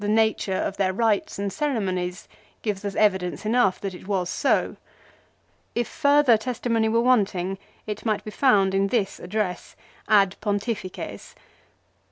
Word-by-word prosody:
1 205 - -2
The 215 - +3
nature 220 -3 +1
of 195 - -2
their 190 -1 +1
rites 220 0 0
and 200 0 -3
ceremonies 185 -11 -2 0.4
give 210 -3 -2
us 200 -1 -4
evidence 190 -2 +1
enough 220 -3 +2
that 195 -2 -4
it 185 - -11
was 185 -3 -1
so. - - +1 1.0
If 240 -1 0
further 285 -4 +4
testimony 230 -1 -1
were 230 +1 +2
wanting 195 -6 +1 0.3
it 210 -1 -5
might 215 -3 0
be 215 - -7
found 205 -6 +3
in 195 0 +2
this 200 -3 -1
address 180 -1 -3 0.2
" - - -29
Ad 195 -1 +1
Pontifices." 205 -2 -4
205 Hz, 155 wpm, -24 LUFS, 190-225 Hz, 1.0 s, further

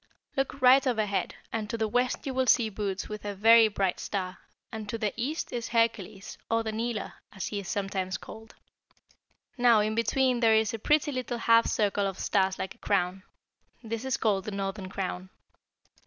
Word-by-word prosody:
"Look 270 -1 -2
right 260 +2 +7
overhead, 215 -5 0 0.2
and 215 -2 -3
to 230 - -2
the 220 -1 0
west 245 +3 0
you 270 - -3
will 260 0 0
see 235 -3 +4
Bootes 195 -2 -3
with 210 -1 -7
a 205 -1 -4
very 225 +3 +7
bright 195 -3 -1
star; 185 -2 -4 0.3
and 215 -2 -6
to 230 - -2
the 215 -3 -1
east 270 +7 -3
is 235 -1 -3
Hercules, 225 -4 -1
or 225 0 +1
the 220 - -3
Kneeler, 225 -1 -3 0.2
as 190 - -5
he 205 - -3
is 195 - -7
sometimes 195 -2 -2
called. 220 +1 -12 1.0
Now, 240 -3 +6
in 215 +1 0
between 245 +3 +1
there 225 -2 +5
is 220 0 +2
a 225 - -4
pretty 295 +5 +2
little 250 -2 -3
half 230 0 +4
circle 205 -1 +1
of 195 -1 -5
stars 190 -1 +1
like 190 - -4
a - - -28
crown. 190 -1 0 0.6
This 230 +1 -4
is 265 0 -1
called 200 -6 0
the - - -3
Northern 195 -1 -4
Crown." 185 -1 -4
220 Hz, 190 wpm, -28 LUFS, 195-235 Hz, 1.0 s, right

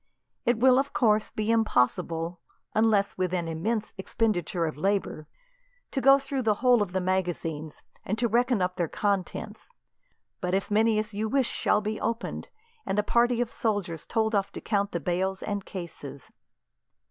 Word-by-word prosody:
It 240 -1 +3
will, 255 +2 +5
of 280 +1 -2
course, 215 -3 +2
be 215 +1 -1
impossible, 170 - +1 0.3
unless 210 -3 +2
with 185 0 0
an 170 -2 -2
immense 210 +7 -2
expenditure 185 -5 0
of 155 - -3
labour, 175 -2 -1 0.6
to 270 - -1
go 275 +1 +7
through 275 -1 -3
the 220 -3 +2
whole 245 0 +4
of 200 -3 -1
the 190 - 0
magazines 175 -5 -2 0.2
and 215 0 -2
to 235 +1 +1
reckon 235 -2 +2
up 180 0 -2
their 175 -3 0
contents; 205 - -3 0.7
but 180 0 -1
as 195 +2 -2
many 220 +1 +3
as 215 0 -2
you 215 +2 -2
wish 270 -1 +2
shall 210 - +1
be 215 +1 -3
opened, 230 +1 -3 0.3
and 195 - -2
a 210 - +3
party 240 +2 +2
of 240 - -2
soldiers 205 - -2
told 220 -1 0
off 200 -2 +1
to - - -5
count 200 -2 0
the 170 - -2
bales 185 +4 -1
and 205 -2 -3
cases." 145 -7 -8
205 Hz, 170 wpm, -27 LUFS, 180-225 Hz, 0.7 s, go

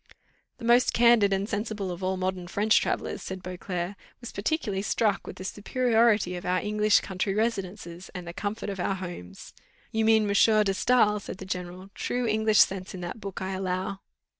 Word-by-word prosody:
"The - - -8
most 240 +2 +4
candid 235 -4 +5
and 195 +1 0
sensible 205 -2 -3
of 175 +1 -7
all 190 0 0
modern 185 -1 -2
French 210 +4 +3
travellers," - - -2
said 190 -1 -6
Beauclerc, 180 +1 -4 0.2
"was 240 - -8
particularly 205 -3 -1
struck 210 -1 0
with - - -7
the - - -8
superiority 220 -2 +2
of 175 - -6
our 180 0 +1
English 210 +2 +3
country 195 +1 -2
residences, 195 -5 -3
and 180 -1 -6
the 170 - -6
comfort 205 +2 -4
of 195 - -7
our 190 +2 0
homes." 175 - -8 0.4
"You 220 0 +1
mean 220 0 +5
M. 205 - -1
de - - +1
Staël?" 210 +1 +3
said 190 - -7
the 190 - -8
general; 185 +1 -6
"true 245 0 -2
English 220 -1 +4
sense 190 -1 0
in 180 - -7
that 175 +5 -6
book, 195 -1 -5
I 190 - -3
allow." 190 +1 -2
195 Hz, 190 wpm, -27 LUFS, 185-215 Hz, 0.4 s, candid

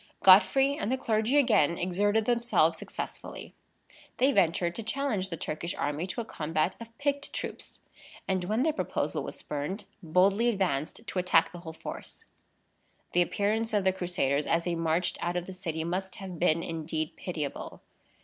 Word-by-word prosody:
Godfrey 270 +9 +7
and 220 -5 -2
the 260 - +1
clergy 225 +2 +1
again 210 - +4
exerted 205 +5 +1
themselves 240 0 +3
successfully. - - -7 0.6
They 265 +2 +4
ventured 175 -5 +2
to 230 - -5
challenge 220 -5 -1
the 165 - -4
Turkish 165 +3 -3
army 150 +5 -2
to 235 - -3
a - - -6
combat 155 0 -1
of 230 0 -11
picked 285 0 -1
troops; - - -6 0.5
and 185 -2 0
when 215 +6 +1
the 315 0 +2
proposal - - -2
was - - -6
spurned, 150 +8 -4 0.2
boldly 195 +7 +3
advanced 190 -2 -1
to 190 - -2
attack 180 -2 +3
the 175 - -9
whole 165 -2 -8
force. - - -8 0.9
The 175 - +3
appearance 215 +5 0
of 205 - +2
the 190 0 +3
Crusaders, 175 -6 0
as 165 0 +2
they 175 - -1
marched 165 +1 0
out 175 +1 -1
of 175 - -2
the 190 - -8
city, 165 -4 -3
must 185 +3 -3
have 185 -4 -8
been 170 -1 +3
indeed 160 -1 -3
pitiable. 155 -6 -5
185 Hz, 170 wpm, -29 LUFS, 165-220 Hz, 0.9 s, Godfrey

